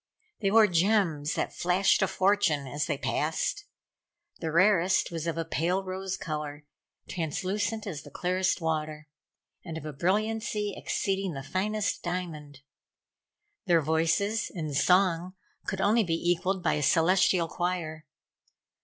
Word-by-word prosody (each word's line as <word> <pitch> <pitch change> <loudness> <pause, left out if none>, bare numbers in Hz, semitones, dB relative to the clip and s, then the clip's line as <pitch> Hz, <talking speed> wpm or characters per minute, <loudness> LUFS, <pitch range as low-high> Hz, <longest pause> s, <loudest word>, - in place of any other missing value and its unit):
They 195 - +1
wore 220 +2 +6
gems 175 -5 +1
that - - -2
flashed 180 +2 +2
a 190 - +3
fortune 190 -6 +2
as 145 +3 -3
they 145 -4 -1
passed. 160 - -1 0.7
The 160 -2 -3
rarest 185 +1 +3
was 165 -1 -4
of 165 - -2
a 165 - -2
pale 175 +4 0
rose 190 0 -4
color, 150 -2 -5 0.4
translucent 195 +6 -2
as 165 -8 -5
the - - -12
clearest 185 +1 0
water, 155 -1 -2 0.6
and 165 -1 -6
of 155 - -8
a 150 - -5
brilliancy 210 - -1
exceeding 195 -2 -2
the 135 - -6
finest 205 +6 -1
diamond. 160 -6 -5 1.1
Their 170 -2 +4
voices, 165 +8 +1
in 155 -6 -4
song, 180 +3 +2 0.3
could 195 -1 -2
only 220 +4 +4
be 165 -4 0
equaled 175 +2 0
by 165 - +2
a 150 - -1
celestial 175 +3 +3
choir. 165 -3 -3
175 Hz, 135 wpm, -28 LUFS, 160-195 Hz, 1.1 s, wore